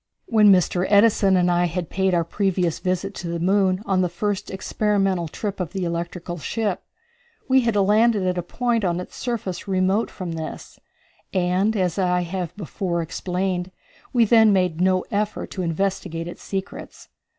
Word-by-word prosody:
When 215 -3 +5
Mr. 180 0 +2
Edison 200 -2 +4
and 180 0 +3
I 175 0 +2
had 175 -1 -3
paid 190 -1 +1
our 170 - +2
previous 180 -1 -1
visit 185 +2 -2
to 175 - -5
the 170 0 -3
moon 190 +2 +2
on 190 -3 +1
the 180 - +1
first 200 +3 -2
experimental 195 -2 0
trip 200 +5 -5
of 180 -1 -4
the 190 -2 -2
electrical 170 +1 -4
ship, 205 +2 -2 0.7
we 265 0 +5
had 230 -3 0
landed 210 +1 +3
at 180 0 0
a 175 - -1
point 235 +5 -1
on 175 -2 0
its 180 - -8
surface 210 -7 -4
remote 190 +3 +1
from 180 -2 -6
this, 160 -1 -7 0.6
and, 185 +4 +1
as 180 -1 0
I 180 -1 +2
have 180 0 -4
before 175 -2 -2
explained, 180 +2 -2 0.4
we 240 -2 +4
then 220 -1 +6
made 180 -4 +1
no 185 0 +2
effort 210 +1 -2
to 190 - -4
investigate 170 -1 -2
its 175 - -9
secrets. 195 -1 -6
185 Hz, 170 wpm, -23 LUFS, 175-205 Hz, 0.7 s, then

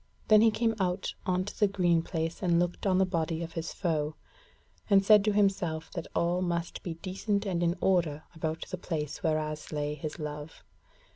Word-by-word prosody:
Then 215 -1 +8
he 225 - +6
came 225 +1 +1
out 185 0 -1
on 185 0 +1
to 205 - -8
the 210 - +5
green 175 -4 +2
place 165 +1 -3
and 175 -3 +3
looked 175 +3 -1
on 185 -1 +3
the 190 - +4
body 165 -2 -1
of 165 0 -7
his 165 0 -4
foe, 155 -4 -1 0.7
and 195 -1 +5
said 210 -1 +7
to 215 - +3
himself 195 -6 +1
that - - -5
all 175 +2 +1
must 170 -1 -2
be 170 -3 -5
decent 200 +2 -1
and 180 -3 -1
in 170 0 +2
order 165 -5 +2
about 160 0 -3
the 185 - -4
place 155 -5 -4
whereas 155 -1 -1
lay 150 -1 -1
his 150 0 -6
love. 150 0 -7
175 Hz, 195 wpm, -29 LUFS, 160-190 Hz, 0.7 s, Then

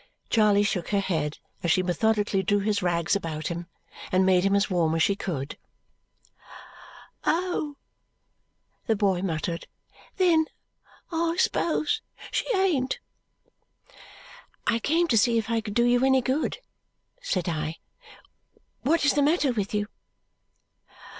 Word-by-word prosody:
Charley 210 -2 +4
shook 200 -4 -1
her 200 - +1
head 160 -6 -1 0.2
as 170 - -1
she 185 +3 +3
methodically 205 +2 +1
drew 205 +2 +1
his 205 0 0
rags 175 +1 +1
about 155 -5 -3
him 170 0 -5 0.4
and 185 +1 +3
made 185 -1 +4
him 195 0 +3
as 200 0 +2
warm 170 -4 +1
as 165 - +3
she 200 - +2
could. 145 -8 -5 1.6
"Oh!" 325 -3 0 1.1
the 225 - +3
boy 195 -3 +1
muttered. 170 -2 -3 0.5
"Then 340 -4 +4 0.7
I 335 0 0
s'pose 375 +4 +1 0.3
she - - 0
ain't." 315 -10 +1 1.7
"I 230 - +2
came 330 +8 +2
to 240 -7 +3
see 235 +1 +3
if 225 0 -1
I 230 -1 +1
could 210 -2 -7
do 240 - +4
you 245 +1 +3
any 265 -1 +4
good," 270 +5 0 0.6
said 185 - -1
I. 155 -1 -2 1.0
"What 315 +2 +2
is 290 - +4
the 290 - +2
matter 295 -1 +3
with 205 -4 -2
you?" 210 -1 0
205 Hz, 135 wpm, -26 LUFS, 180-270 Hz, 1.7 s, Charley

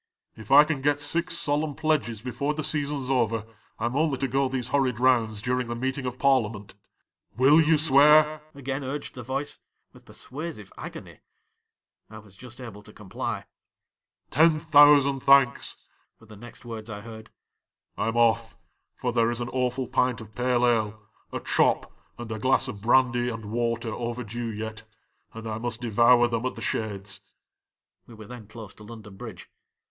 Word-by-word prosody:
'" - - -66
If 110 -2 -11
I 145 +2 +9
can 150 -3 -3
get 145 +1 +1
six 170 +4 -1
solemn 145 -1 -1
pledges 150 -9 -1
before 135 +4 -2
the 155 - -3
season 145 -2 -1
's 130 - -3
over, 115 -4 0 0.3
I 110 - -3
'm 120 +2 -2
only 150 -2 +1
to 135 - -1
go 135 +1 0
these 130 -2 -3
horrid 130 -4 +1
rounds 115 -5 +2
during 125 0 -1
the 120 - -4
meeting 130 +2 -3
of 125 0 -5
Parb'ament." 115 -7 +1 0.2
' - - -51
" - - -35
Will 140 +5 +6
you 160 0 +4
swear?" 150 +1 +5
again 135 0 -4
urged 135 +3 -5
the 125 - -8
voice, 135 +4 -4 0.3
with - - -17
persuasive 145 - -8
agony. - - -9 0.5
' - - -57
I 110 - -11
was 100 -3 -15
just 125 +4 -12
able 115 -5 -9
to 105 - -15
comply. 105 -3 -5 0.9
'"Ten 160 0 +4
thousand 145 -3 +5
thanks!" 135 -1 +4 0.4
were 115 - -18
the 110 -1 -13
next 120 +2 -13
words 115 -1 -7
I 105 -1 -7
heard; 110 0 -11 0.3
" - - -59
I - - -2
!m 115 +1 -1
off, 115 -1 +2 0.4
for - - -3
there 115 0 +2
is 120 0 -2
an 120 0 -4
awful 130 0 -1
pint 125 -2 +1
of 110 -1 -12
pale 125 +1 +1
ale, 110 -3 +1 0.3
a - - -3
chop, - - +1 0.2
and 120 -1 -8
a 110 - -4
glass 130 +3 +2
of 105 -5 -7
brandy 120 +1 +3
and 115 -3 -7
water 115 -1 -1
overdue 120 -1 -4
yet, 110 0 -6 0.5
and 115 0 -8
I 110 0 -4
must 120 0 -4
devour 120 +1 +4
them 115 -1 -2
at - - -5
the - - -9
Shades." 100 -2 -4 0.9
(We 115 - -13
were 110 0 -11
then 120 -2 -11
close 110 -2 -10
to 105 - -15
London 105 -2 -11
Bridge.) - - -10
120 Hz, 185 wpm, -26 LUFS, 110-140 Hz, 0.9 s, I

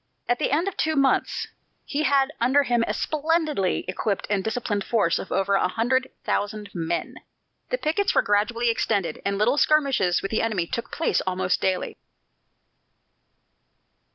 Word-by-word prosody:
At 245 0 +1
the - - +1
end 320 +7 +1
of 395 - -3
two 315 0 0
months, 275 -1 +1 0.4
he 290 - -2
had 280 0 +2
under 265 +4 +4
him 240 -3 +1
a - - -1
splendidly 310 - 0
equipped 195 +2 -2
and 200 -2 +1
disciplined 220 -2 -2
force 200 -6 +1
of - - -8
over 195 +1 +1
a 195 - +3
hundred 260 +6 0
thousand 205 0 -2
men. 170 -1 -3 0.5
The - - 0
pickets 390 +2 0
were - - +4
gradually 230 +3 +1
extended, 200 -8 -1
and 200 0 -1
little 240 +8 +2
skirmishes 275 - +2
with 195 - -3
the 220 - +1
enemy 210 -7 0
took 235 +6 -5
place 325 - 0
almost 185 0 0
daily. 185 -1 -1
230 Hz, 155 wpm, -24 LUFS, 195-280 Hz, 0.5 s, under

